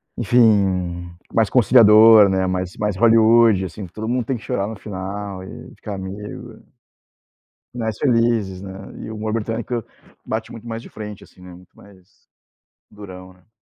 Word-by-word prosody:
enfim, 95 -7 +1 0.2
mais 110 -2 +2
conciliador, 110 -3 +6
né, 95 -1 0
mais 90 0 -3
mais 105 -3 -2
Hollywood, 115 -3 +4
assim, 95 +3 -8
todo 110 +6 -7
mundo 125 -1 -1
tem 130 -2 -2
que - - -14
chorar 100 +1 -2
no 110 - -6
final 100 -1 -6
e - - -11
ficar 105 -2 -7
amigo. 95 +2 -8 1.1
Finais 110 -3 -4
felizes, 115 -7 0
né, 95 -1 -8 0.3
e - - -8
o 110 - -7
humor 110 0 -4
britânico 115 +1 -3 0.4
bate 110 0 -5
muito 115 +1 -11
mais 115 0 -5
de - - -13
frente 105 -2 -9
assim, 90 - -20
né, 90 -1 -12
muito 90 +1 -18
mais 95 -3 -19 0.8
durão, 95 -3 -12
né. 90 +3 -27
105 Hz, 160 wpm, -20 LUFS, 95-115 Hz, 1.1 s, conciliador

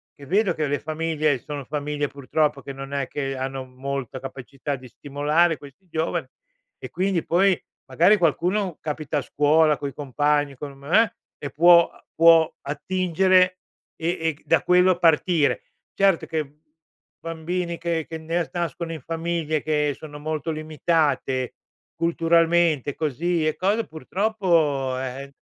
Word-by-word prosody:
che 140 - -13
vedo 195 +2 +2
che 155 -2 -1
le 145 0 -1
famiglie 155 -2 -1
sono 145 +1 -7
famiglie, 145 0 -2
purtroppo, 140 +1 -1
che 140 - -7
non 135 +1 -8
è 140 -2 -1
che 135 -2 -3
hanno 135 0 -4
molta 130 0 -5
capacità 135 +2 -6
di 130 -1 -12
stimolare 150 +6 +1
questi 145 +6 -15
giovani. 160 -2 -2 0.5
E - - -8
quindi, 185 -3 0
poi, 185 +1 +3 0.3
magari 185 +6 +4
qualcuno 180 +2 0
capita 150 0 -3
a - - +1
scuola 150 +2 +3
coi 140 0 -5
compagni, 145 0 0
con 140 +2 -7
m 140 - -18
eh, 225 0 +5 0.3
e 145 - -5
può 170 +3 +6
uhm, - - -20
può 165 -1 +6
attingere, 185 +4 +2 0.4
e 165 - -2
e 160 0 +1
c 150 - -26
da 165 -3 +3
quello 180 0 +4
partire. 165 - +3 0.4
Certo 195 -3 +3
che 160 -1 -2
b 150 +3 -25 0.6
bambini 170 +1 -3
che 170 -2 -2
che 160 - -5
nes 165 +2 -2
nascono 170 -1 -3
in 160 - -5
famiglie, 165 0 -2
che 150 -2 +1
sono 145 -2 -10
molto 155 +1 -3
limitate 155 -4 0 0.4
culturalmente, 165 -3 +2
così 160 +2 0
e 155 - 0
code 205 +4 0
purtroppo, 160 -7 0
eh, 130 +1 -5
eh, 140 0 -13
155 Hz, 150 wpm, -24 LUFS, 145-170 Hz, 0.6 s, può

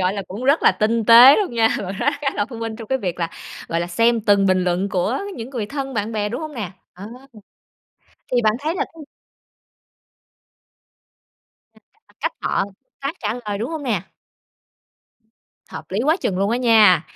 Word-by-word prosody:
gọi 185 +1 +1
là, 200 -1 -4
cũng 205 +7 -6
rất 280 +4 +3
là - - +6
tinh 225 +1 0
tế 240 +5 +9
luôn 390 - -1
nha, 225 -1 +3
bạn 195 +1 -6
nói 285 - +2
khá 280 - 0
là 205 - 0
thông 235 -3 -9
minh 225 -1 -5
trong 225 -2 -10
cái 265 - 0
việc 180 -5 -4
là, 165 0 -1 0.4
gọi 165 +1 -1
là, 175 - -2
xem 230 +6 +2
từng 200 -2 +3
bình 185 -1 +2
luận 180 +2 0
của 195 +7 -1 0.2
những 235 +1 -7
người 235 -6 -4
thân, 270 +1 -5
bạn 215 +1 -2
bè, 210 -1 -1
đúng 245 +6 -5
hông 310 -2 -7
nè? 210 -7 -5 0.2
Ờ. 190 +3 -10 1.3
Thì 245 -1 +2
bạn 215 -1 +3
thấy 315 +4 -2
là - - -1
cái 320 - -11 2.7
Nhìn - - -24
cách - - -54
mà - - -26
cách - - -1
họ - - 0
tương 200 +6 -18
tác, 275 +4 -3
trả 215 0 -2
lời, 205 -1 -3
đúng 235 +8 -4
hông 320 -2 -5
nè? 220 -9 -1 1.7
Hợp - - -8
lý 195 - -2
quá 315 +4 +3
chừng 185 - -1
luôn 200 +2 +1
á 235 - +1
nha. 215 -9 +5
220 Hz, 205 wpm, -21 LUFS, 195-255 Hz, 2.7 s, tế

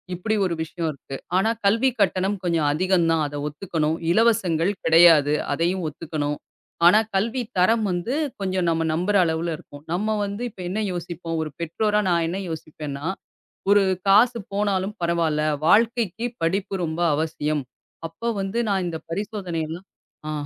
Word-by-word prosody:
இப்படி 215 +5 -1
ஒரு 175 - -1
விஷயம் 160 0 -3
இருக்கு. 135 -1 -9 0.2
ஆனா 205 +4 +2 0.2
கல்விக் 230 +5 +3
கட்டணம் 195 +1 +1
கொஞ்சம் 165 -4 +1
அதிகம்தான். 165 -2 +2
அத 145 - -8
ஒத்துக்கணும். 160 0 -2
இலவசங்கள் 195 -5 +3
கிடையாது. 160 -3 +6 0.2
அதையும் 170 +4 0
ஒத்துக்கணும். 150 -1 -3 0.5
ஆனா 210 +5 +7 0.2
கல்வித்தரம் 225 -1 +1
வந்து 175 +8 -2 0.3
கொஞ்சம் 185 -2 0
நம்ம 165 0 +1
நம்புற 180 +5 0
அளவுல 165 +1 -1
இருக்கும். 145 -4 -14
நம்ம 215 +4 0
வந்து 200 +4 -5
இப்ப 190 - -11
என்ன 215 +4 -2
யோசிப்போம். 170 -1 -5
ஒரு 155 - -6
பெற்றோரா 210 +6 +1
நான் 170 -1 +2
என்ன 185 +3 -3
யோசிப்பேன்னா, 150 -2 -6 0.7
ஒரு 205 0 +6 0.3
காசு 235 +4 +5 0.2
போனாலும் 200 0 0
பரவாயில்ல. 165 -3 +1 0.2
வாழ்க்கைக்குப் 230 +2 +2
படிப்பு 195 +4 0
ரொம்ப 160 +2 -3
அவசியம். 155 -1 -1 0.5
அப்ப 230 +8 -3
வந்து 195 +5 -2
நான் 190 -2 +1
இந்தப் 165 -1 -6
பரிசோதனை 195 -4 -3
எல்லாம் 175 +4 -7 0.4
ஆ - - -2
175 Hz, 140 wpm, -23 LUFS, 160-205 Hz, 0.7 s, ஆனா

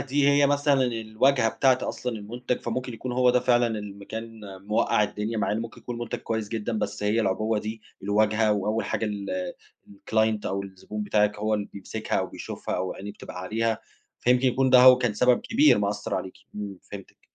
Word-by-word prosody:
دي 140 +1 +1
هي 140 0 +5
مثلًا 145 -1 +3
الواجهة 115 +1 +1
بتاعة 130 +2 +3
أصلًا 125 - -3
المُنتَج 120 +4 -4
فممكن 125 +1 -3
يكون 125 +2 -5
هو 125 0 +4
ده 125 0 +3
فعلًا 120 -1 +3
اللي 105 -1 -7
م 100 - -13
كان 115 +1 -7 0.3
مُوَقَع 105 0 +2
الدنيا 105 +2 -2
مع - - 0
إن 110 - -1
ممكن 115 -1 -8
يكون 120 -1 -6
مُنتَج 120 -1 -4
كويس 110 -2 -3
جدًا 110 0 -2
بس - - -3
هي 105 +2 +2
العُبوة 110 +2 0
دي 110 +1 -6 0.2
الواجهة 105 +2 +2
وأول 105 +2 -1
حاجة - - -2
ال 100 -3 -3 0.4
الclient 110 +1 0
أو 100 +1 -2
الزبون 100 +2 -7
بتاعِك 105 0 +1
هو 110 +1 0
اللي 105 -1 -3
بيمسكها 100 - -3
أو - - -1
بيشوفها - - -5
أو 95 - -2
عينيه 100 +2 -7
بتبقى 90 - -9
عليها 110 +4 -1 0.4
فيمكن 125 +1 +3
يكون 130 +1 +2
ده 130 - +8
هو 125 0 +9
كان 120 -4 0
سبب 125 +3 +3
كبير 285 +7 +4
مأثر 105 0 -2
عليكِ. 95 - -4 0.2
إمم، 100 -2 -6
فهمتِك. 100 -2 -10
110 Hz, 195 wpm, -26 LUFS, 105-125 Hz, 0.4 s, هو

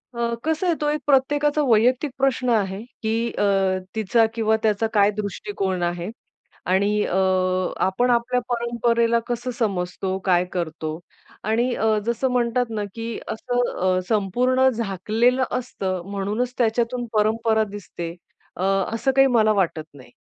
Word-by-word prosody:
अ, 235 0 -1
कसं 320 +3 0
आहे 340 - +2
तो 295 - +1
एक 300 0 -1
प्रत्येकाचा 290 +2 +3
वैयक्तिक 250 +5 +3
प्रश्न 260 -2 +1
आहे, 200 -3 0 0.2
की 230 +1 0
अ, - - -2 0.5
तिचा 220 +2 +3
किंवा 220 -1 +2
त्याचा 215 +1 +2
काय 205 -1 +5
दृष्टिकोन 200 -2 -3
आहे 175 +1 -2 0.6
आणि 200 +3 +2
अ, - - -2 0.7
आपण 240 +7 +1
आपल्या 240 +1 +1
परंपरेला 235 0 +1
कसं 240 +1 -3
समजतो, 190 -3 -1
काय 180 -1 +3
करतो 160 -2 -3 0.4
आणि 235 +4 +1
अ, 220 - 0 0.2
जसं 235 +3 0
म्हणतात 245 0 +1
ना 215 -2 -3
की 230 0 -4
असं 245 +2 -1
अ, 185 0 +2
संपूर्ण 250 +6 +2
झाकलेलं 230 +3 +1 0.2
असतं 190 -7 -4
म्हणूनच 210 +5 -2
त्याच्यातून 240 +1 0
परंपरा 220 +1 +2
दिसते 170 -4 -7 0.4
अ, 180 - -4 0.3
असं 230 +4 +1
काही 270 0 +6
मला 215 -1 +4
वाटत 175 -5 0
नाही. 130 -4 -15
225 Hz, 140 wpm, -23 LUFS, 195-245 Hz, 0.7 s, काही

